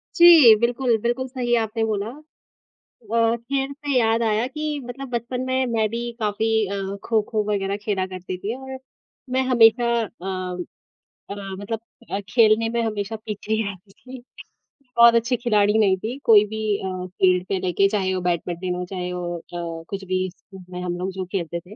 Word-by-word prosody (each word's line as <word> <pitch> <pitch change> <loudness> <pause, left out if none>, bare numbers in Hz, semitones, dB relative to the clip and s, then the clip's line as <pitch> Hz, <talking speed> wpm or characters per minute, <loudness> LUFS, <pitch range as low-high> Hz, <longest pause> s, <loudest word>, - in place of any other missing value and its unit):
जी। 325 -10 +9
बिल्कुल, 240 0 +1
बिल्कुल 240 +3 -1
सही 250 -2 -2
आपने 225 +1 -3
बोला 210 -1 -2 1.0
अ, 230 0 +3
खेल 270 +4 -3
से 285 -1 -3
याद 225 -1 +2
आया 220 +1 +1
कि 300 +2 -3
मतलब 265 +2 -7
बचपन 245 +1 -3
में 260 0 +1
मैं 225 -3 +1
भी 235 +2 -4
काफ़ी 215 0 0 0.2
अ, 195 0 -4
खो-खो 215 -1 0
वग़ैरह 200 -1 -1
खेला 195 -3 -1
करती 185 0 -6
थी 210 +6 -4
और 265 0 -8 0.6
मैं 260 - +2
हमेशा 235 0 +5 0.2
अ - - -4 1.2
अ, 200 - -4 0.2
मतलब 210 +2 -4 0.3
अ, 195 - -1
खेलने 225 0 +4
में 235 0 -1
हमेशा 215 -1 -2
पीछे 215 0 -5
ही 220 - +1
आती 195 +1 -16
थी। 255 +4 -12 0.7
बहुत 235 0 +8
अच्छी 235 +2 +2
खिलाड़ी 210 -3 +2
नहीं 195 -3 +3
थी 225 +7 -5
कोई 210 -2 +7
भी 220 +1 -5 0.2
अ, 185 -2 -4
फ़ील्ड 185 0 +2
पे 195 -2 0
लेके 185 +2 +2
चाहे 190 -2 0
वो 185 - -2
बैडमिंटन 175 +1 -2
हो, 180 0 -4
चाहे 180 -1 -5
वो 175 -1 -4 0.2
अ, 165 -1 -5
कुछ 195 -1 -5
भी 185 0 -1
स्कूल 190 +1 -15
में 180 0 -6
हम 175 -1 -3
लोग 185 +1 -3
जो 185 0 -5
खेलते 170 -3 -2
थे। 185 +4 -14
215 Hz, 180 wpm, -23 LUFS, 190-235 Hz, 1.2 s, जी